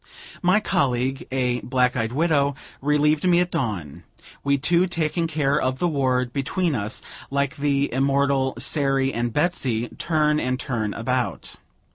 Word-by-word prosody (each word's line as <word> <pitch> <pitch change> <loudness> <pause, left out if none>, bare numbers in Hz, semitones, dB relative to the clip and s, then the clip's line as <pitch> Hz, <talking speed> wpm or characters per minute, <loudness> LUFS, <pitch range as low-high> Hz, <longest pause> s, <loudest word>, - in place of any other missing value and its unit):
My 185 +3 +4
colleague, 130 - 0
a 125 -2 0
black 125 0 +1
eyed 115 -2 -1
widow, 145 -1 +1 0.3
relieved 150 +1 +2
me 175 -1 +5
at 180 0 0
dawn, 105 - -3 0.4
we 140 0 +2
two 170 +6 +3
taking 165 -1 -1
care 145 -3 +1
of 130 0 0
the 175 - +1
ward, 130 -5 0
between 160 +5 -1
us, 105 -2 -2 0.3
like 140 0 -1
the 140 -1 0
immortal 135 0 +1
Sairy 135 0 +1
and 120 0 -1
Betsey, 125 -6 0
"turn 150 -2 +2
and 130 -1 -1
turn 110 -7 -2
about." 120 -2 -2
135 Hz, 145 wpm, -23 LUFS, 125-150 Hz, 0.4 s, me